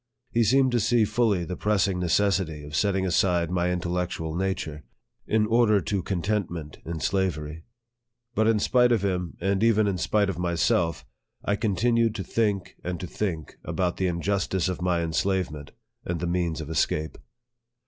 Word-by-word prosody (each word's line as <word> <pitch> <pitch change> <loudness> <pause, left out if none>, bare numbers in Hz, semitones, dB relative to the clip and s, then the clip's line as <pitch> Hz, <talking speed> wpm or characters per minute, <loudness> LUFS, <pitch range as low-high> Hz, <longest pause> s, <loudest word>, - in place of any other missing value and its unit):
He 115 0 +3
seemed 130 +4 +4
to 120 - +2
see 115 +1 +3
fully 105 -4 +1
the 90 - -4
pressing 100 -3 +1
necessity 90 -3 +1
of 75 0 -7
setting 95 +1 +1
aside 90 -1 +2
my 90 -1 +1
in 90 0 0
tellectual 85 -2 -2
nature, 90 -5 -2 0.4
in 110 0 +2
order 110 -2 +4
to 100 0 -2
contentment 85 -4 -3
in 80 -1 -5
slavery. 80 -4 -2 0.7
But 110 -1 +2
in 115 -1 +4
spite 125 +3 +3
of 110 -4 +2
him, 90 -3 -2
and 95 +3 0
even 110 -2 +4
in 95 -3 -1
spite 105 +3 +2
of 95 -3 -3
myself, 85 -1 +1 0.4
I 100 - +2
con 105 -2 -1
tinued 115 +2 +2
to 100 - -3
think, 100 0 -1
and 90 -1 -3
to 90 - -4
think 85 -4 -4
about 90 -2 -1
the 95 - +1
injustice 95 +1 0
of 90 -1 -3
my 90 -1 +1
enslavement, 85 -3 -1 0.3
and 85 -1 -3
the 90 - -2
means 85 -2 -1
of 75 - -7
escape. 80 0 -1
95 Hz, 170 wpm, -26 LUFS, 85-105 Hz, 0.7 s, seemed